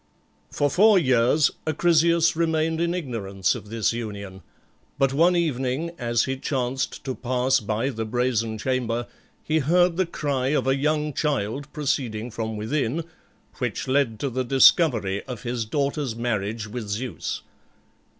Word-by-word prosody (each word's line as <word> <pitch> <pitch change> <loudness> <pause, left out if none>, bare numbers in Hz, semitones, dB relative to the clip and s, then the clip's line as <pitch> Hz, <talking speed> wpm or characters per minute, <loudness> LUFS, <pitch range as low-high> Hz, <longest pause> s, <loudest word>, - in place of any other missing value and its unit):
For 145 - +1
four 210 +3 +6
years 130 -1 +3 0.2
Acrisius 170 +1 +3
remained 160 0 0
in 170 +1 0
ignorance 100 - -1
of 105 -4 -8
this 115 0 0
union, 100 -4 -6 0.6
but 135 -1 +2
one 170 +5 +4
evening 150 -1 -1
as 120 -2 +1
he 135 0 -2
chanced 130 -1 -2
to 130 - -3
pass 130 +2 +1
by 110 +4 -1
the 115 -4 -3
brazen 115 -1 -1
chamber, 120 0 -1 0.4
he 155 +1 +1
heard 175 +4 +3
the 185 -2 +1
cry 140 -6 -1
of 150 0 +1
a 135 0 +3
young 150 +1 0
child 140 -1 -2
proceeding 125 -6 -2
from 110 0 -4
within, 135 +7 -1 0.6
which - - -2
led 130 -5 +1
to 140 - -1
the 130 +2 -1
discovery 120 - +4
of 125 -5 -7
his 120 -1 -2
daughter's 140 0 -1
marriage 110 -2 -2
with 110 0 -6
Zeus. 110 +4 -4
130 Hz, 145 wpm, -24 LUFS, 115-150 Hz, 0.6 s, four